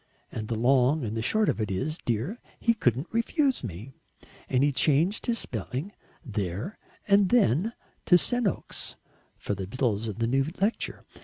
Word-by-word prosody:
And 110 -1 -5
the 115 - -1
long 130 +5 +3
and 110 0 -3
the 115 - -1
short 215 - +2
of - - 0
it 105 - -1
is, 140 - -2
dear, 120 - -2 0.2
he 230 - +3
couldn't 130 - +1
refuse 260 - +1
me, 110 +5 -7 0.6
and 130 +1 +3
he 145 - +4
changed 155 - +2
his 235 -1 +2
spelling 130 - -4 0.3
there 100 - -3 0.3
and 200 -2 +5
then 215 - +3 0.3
to 180 - +8
Senoks 240 +1 -1 0.4
for - - -3
the 95 -2 -4
bills 115 -1 0
of 110 - -5
the 115 - +1
new 135 +4 +2 0.2
lecture. 210 +4 -1
135 Hz, 165 wpm, -27 LUFS, -, 0.6 s, to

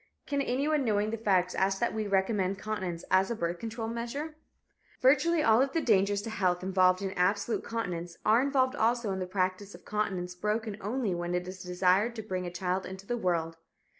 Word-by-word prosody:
Can 280 -1 -1
anyone 280 +3 +1
knowing 210 -2 +1
the - - -1
facts 185 -4 +2
ask 195 0 +1
that 235 - 0
we 215 -1 -2
recommend 195 -1 +1
continence 190 -5 -4
as 190 +1 +4
a 235 - -1
birth 170 -3 -2
control 225 0 -4
measure? 240 +7 -4 0.7
Virtually 300 +5 +4
all 225 0 +5
of 270 0 0
the 330 - +2
dangers 200 -3 +2
to 225 - -5
health 185 -4 0
involved 185 0 +3
in 195 - -2
absolute 200 +5 0
continence 175 -7 -4
are 220 +3 +5
involved 265 -2 +2
also 235 -3 +1
in 190 - -2
the 185 - -3
practice 185 +1 -2
of - - -16
continence 190 -4 -2
broken 210 +3 -2
only 220 -1 -1
when 175 0 -2
it 180 0 -2
is 185 0 -7
desired 185 +5 +2
to 220 - -5
bring 185 -3 -3
a - - -5
child 185 +1 -2
into 190 +1 -9
the 240 - -1
world. 170 -6 -1
200 Hz, 200 wpm, -30 LUFS, 185-230 Hz, 0.7 s, all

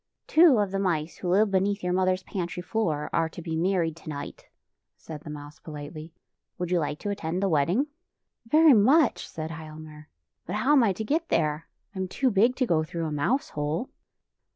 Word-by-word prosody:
" - - -60
Two 315 -5 +6
of 205 -2 +1
the 195 - -1
mice 170 -4 -1
who 180 - -4
live 200 +3 +3
beneath 200 +1 +1
your 180 0 0
mother's 185 0 +1
pantry 180 -1 -4
floor 165 -9 -1
are 165 -1 +1
to 160 - -10
be 165 -1 -4
married 170 -1 0
tonight," 150 -3 -8 0.5
said 155 -2 -9
the 155 - -10
mouse 150 0 -9
pohtely. 155 +1 -8 0.3
" - - -59
Would 180 -1 -3
you 180 - +3
like 150 -1 -2
to 205 - -2
attend 180 -1 -3
the - - +3
wedding? 175 - +2 0.2
" - - -58
" 230 - -27
Veiy 310 -1 +7
much," 260 +7 +4
said 160 0 -6
Hialmar, 155 -1 -10 0.2
" - - -57
but 180 - -3
how 250 +7 +1
am 290 -3 +6
I 215 - +3
to 220 - -5
get 315 +8 -1
there? 155 0 0 0.3
I 190 - -7
am 190 - -1
too 255 +7 0
big 225 +5 +3
to 255 - +1
go 160 -8 +2
through 165 +1 -4
a 155 - -3
mouse 245 - 0
hole." 150 - -3
180 Hz, 220 wpm, -26 LUFS, 155-210 Hz, 0.5 s, Veiy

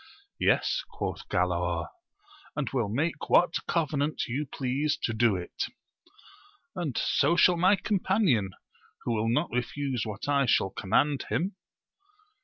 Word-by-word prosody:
Yes, - - +2
quoth - - -5
Galaor, - - 0 0.7
and 150 -2 -2
will 120 -6 0
make 150 +7 -2
what 175 -1 +5
covenant 155 -2 0
you 135 +5 -3
please 140 +3 -1
to 115 - 0
do 110 -2 +3
it; 90 -1 -4 1.1
and 165 -9 -3
so 170 - +2
shall 180 +1 +5
my 185 +4 +4
com 200 +1 -1
panion, 175 - +2 0.5
who - - -1
will 110 0 0
not 150 +8 +1
refuse 125 +1 -2
what 110 +2 -6
I 140 -2 +2
shall 95 -4 +2
command 135 +8 +1
him. 185 +4 -1
140 Hz, 135 wpm, -28 LUFS, 120-170 Hz, 1.1 s, what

